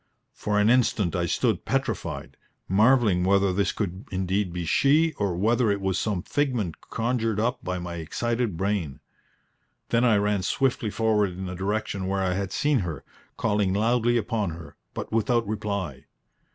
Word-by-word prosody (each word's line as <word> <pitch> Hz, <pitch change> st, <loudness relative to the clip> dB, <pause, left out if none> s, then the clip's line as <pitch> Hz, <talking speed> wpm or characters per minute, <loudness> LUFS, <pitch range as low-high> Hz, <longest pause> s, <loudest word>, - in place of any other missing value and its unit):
For 105 Hz, 0 st, -1 dB
an 105 Hz, -, +4 dB
instant 110 Hz, -7 st, +2 dB
I 85 Hz, -1 st, 0 dB
stood -, -, 0 dB
petrified, -, -, -3 dB, 0.3 s
marvelling 105 Hz, -2 st, +4 dB
whether 100 Hz, 0 st, +3 dB
this 100 Hz, +2 st, +1 dB
could 95 Hz, -2 st, -4 dB
indeed 95 Hz, 0 st, -1 dB
be 90 Hz, 0 st, -4 dB
she, 150 Hz, -, +3 dB
or 100 Hz, -4 st, 0 dB
whether 115 Hz, +4 st, +2 dB
it 100 Hz, 0 st, +1 dB
was 95 Hz, -1 st, 0 dB
some 100 Hz, -5 st, -1 dB
figment 125 Hz, -, -1 dB
conjured 115 Hz, -2 st, 0 dB
up 125 Hz, +3 st, -1 dB
by 90 Hz, 0 st, -2 dB
my 85 Hz, -1 st, -5 dB
excited 115 Hz, +4 st, -2 dB
brain. 95 Hz, -7 st, -1 dB, 0.9 s
Then 115 Hz, +1 st, +2 dB
I 115 Hz, -4 st, +5 dB
ran 105 Hz, -1 st, +1 dB
swiftly 120 Hz, +2 st, 0 dB
forward 105 Hz, -3 st, +1 dB
in 95 Hz, +2 st, -6 dB
the 90 Hz, -, -5 dB
direction 95 Hz, 0 st, -2 dB
where 95 Hz, 0 st, 0 dB
I 90 Hz, -1 st, +1 dB
had 95 Hz, 0 st, -3 dB
seen 145 Hz, -3 st, +2 dB
her, 80 Hz, -7 st, -4 dB, 0.3 s
calling 105 Hz, -3 st, +1 dB
loudly 120 Hz, +2 st, +2 dB
upon 110 Hz, -3 st, -1 dB
her, 80 Hz, 0 st, -9 dB, 0.2 s
but -, -, -5 dB
without 115 Hz, 0 st, +1 dB
reply. 100 Hz, -8 st, -3 dB
100 Hz, 165 wpm, -26 LUFS, 95-115 Hz, 0.9 s, I